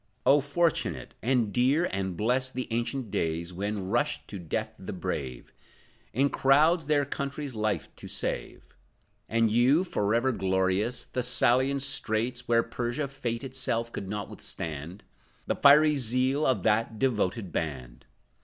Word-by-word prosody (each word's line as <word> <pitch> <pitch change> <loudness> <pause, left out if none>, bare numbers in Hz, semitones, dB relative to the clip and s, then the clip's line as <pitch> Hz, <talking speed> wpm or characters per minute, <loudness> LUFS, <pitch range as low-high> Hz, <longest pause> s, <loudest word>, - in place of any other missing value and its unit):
Oh 145 - +6
fortunate 140 - -1
and 120 -4 +1
dear 135 +8 +3
and 95 -2 -3
blessed, 130 +4 0
The 130 - -3
ancient 120 0 -2
days, 85 +2 -2
when 100 +1 -3
rushed 120 +7 0
to 100 - -6
death 85 -3 -3
the - - -6
brave, 65 -3 -5 0.6
In 135 +4 +1
crowds, 150 +4 +4
their 145 -2 +2
country's 140 0 -4
life 110 -1 -1
to - - -9
save! - - -4 0.5
And 115 -1 +2
you, 130 +9 +4
forever 115 - +1
glorious, 95 +3 0
Thessalian 130 +2 +2
straits, 120 -3 -2
Where 115 -1 +4
Persia, 120 +4 -3
Fate 125 -3 -4
itself, 125 -3 -2
could 95 - -5
not 105 0 -3
withstand 80 +4 -6 0.4
The - - 0
fiery 150 +2 +6
zeal 130 +2 +1
of 120 -8 +1
that 110 +1 +1
devoted 105 -6 0
band! 65 -8 -5
120 Hz, 135 wpm, -28 LUFS, 100-135 Hz, 0.6 s, Oh